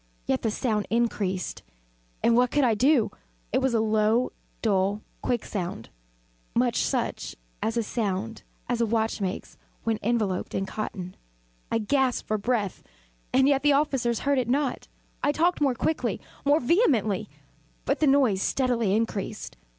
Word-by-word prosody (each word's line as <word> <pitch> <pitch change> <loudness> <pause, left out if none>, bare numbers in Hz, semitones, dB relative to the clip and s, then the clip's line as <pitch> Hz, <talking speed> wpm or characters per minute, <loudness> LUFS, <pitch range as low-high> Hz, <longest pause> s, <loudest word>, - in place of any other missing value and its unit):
Yet 130 - 0
the 225 - 0
sound 215 -1 -1
increased 205 -5 -1 0.6
and 230 - +4
what 250 +1 +4
could 290 +2 +2
I 240 -3 +4
do? 255 +1 +3 0.4
It - - +4
was 265 -3 +1
a - - +3
low, 220 +2 +2 0.3
dull, 200 -1 +1 0.2
quick 240 -2 -1
sound 175 - -4 0.7
much - - +2
such - - -2 0.3
a 225 - +1
sound 225 -2 -2 0.3
as 245 -1 0
a 230 - +2
watch 220 -1 0
makes 190 -1 -4 0.3
when 225 -2 0
enveloped 210 -5 -1
in 195 - 0
cotton. 190 -3 -5 0.6
I - - +2
gasped 255 +3 +1
for 215 0 0
breath 210 -3 -1 0.5
and 265 +1 +4
yet 275 -1 +3
the 290 0 +4
officers 270 -5 +1
heard 280 -1 +2
it 245 -2 -2
not. 275 0 0 0.3
I 290 - +3
talked 335 +3 +1
more 270 -4 +3
quickly 315 +6 -1 0.3
more 290 +2 +5
vehemently; 240 - +2 0.6
but - - 0
the 310 - +3
noise 260 -9 +4
steadily 235 -6 +1
increased. 220 -3 -3
230 Hz, 150 wpm, -26 LUFS, 210-265 Hz, 0.7 s, more